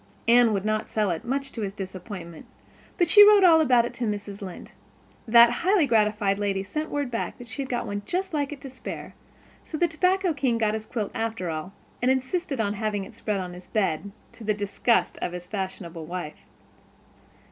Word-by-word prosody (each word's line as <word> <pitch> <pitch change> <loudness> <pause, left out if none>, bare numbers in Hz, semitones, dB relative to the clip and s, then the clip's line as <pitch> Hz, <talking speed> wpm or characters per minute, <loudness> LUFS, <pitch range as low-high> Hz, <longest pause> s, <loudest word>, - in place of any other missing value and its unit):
Anne 235 -1 +6
would 200 -1 -1
not 215 0 -1
sell 210 -4 0
it, 165 - -3
much 275 +2 -2
to 230 - -6
his 195 -1 -4
disappointment, 185 -3 -8 0.5
but 350 - +3
she 415 +5 +9
wrote 415 -1 +7
all 330 -3 +7
about 250 -5 +4
it - - -5
to 245 - -3
Mrs. 205 -1 -5
Lynde. 185 -3 -8 0.6
That 235 +1 +8
highly 370 -2 +4
gratified 210 -4 +2
lady 195 -2 -1
sent 305 +11 -4
word 285 -3 -2
back 230 - -3
that 245 - -11
she 255 +5 -5
had 265 - -5
one 205 0 -4
just 365 - -3
like 290 -2 -1
it 295 - -7
to 275 - -8
spare, 260 - -8 0.5
so 310 - -6
the 345 - +3
tobacco 365 +2 +1
king 260 -5 0
got 215 -2 +1
his 220 0 -4
quilt 215 -5 -3
after 225 -6 -2
all, 155 +4 -5 0.3
and 250 - +2
insisted 265 +2 -1
on 205 -2 0
having 210 -1 -2
it 220 - -11
spread 210 -2 -2
on 180 -1 -5
his 180 +1 -12
bed, 200 -3 -1 0.2
to 230 - -13
the 215 -1 0
disgust 205 -1 0
of 175 - -2
his 180 0 -7
fashionable 180 -4 -5
wife. 175 -3 -7
220 Hz, 200 wpm, -26 LUFS, 195-270 Hz, 0.6 s, she